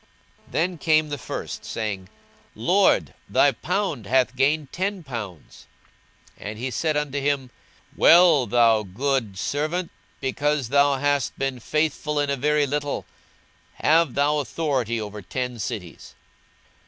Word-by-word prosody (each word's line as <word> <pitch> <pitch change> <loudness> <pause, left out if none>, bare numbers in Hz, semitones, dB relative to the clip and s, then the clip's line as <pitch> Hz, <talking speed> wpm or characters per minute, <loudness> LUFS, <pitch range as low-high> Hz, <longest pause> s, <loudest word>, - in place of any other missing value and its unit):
42:019:016 - - -22
Then 175 +2 0
came 155 -1 +3
the 145 - -3
first, 125 - -6
saying, 100 -4 -4 0.5
Lord, 180 - +2 0.2
thy - - +4
pound 155 - -2
hath 130 +1 +2
gained 145 +2 +1
ten 190 0 -2
pounds. 105 - -8 0.7
42:019:017 - - -6
And 105 - -7
he 130 +3 -4
said 155 +5 0
unto 145 -1 -2
him, 135 -3 -1 0.4
Well, 165 -7 +6
thou 115 -2 +4
good 110 +1 -2
servant: 155 - -2 0.3
because 145 -1 -1
thou 140 +1 +4
hast 145 -1 0
been 135 -2 -2
faithful 150 +2 -1
in 145 -1 0
a - - +1
very 150 +2 +2
little, 145 +1 -2 0.7
have 160 -3 +3
thou 145 +1 +2
authority 130 -4 -1
over 105 -1 -6
ten 125 +5 -4
cities. 95 -5 -6
140 Hz, 135 wpm, -24 LUFS, 120-150 Hz, 0.7 s, Well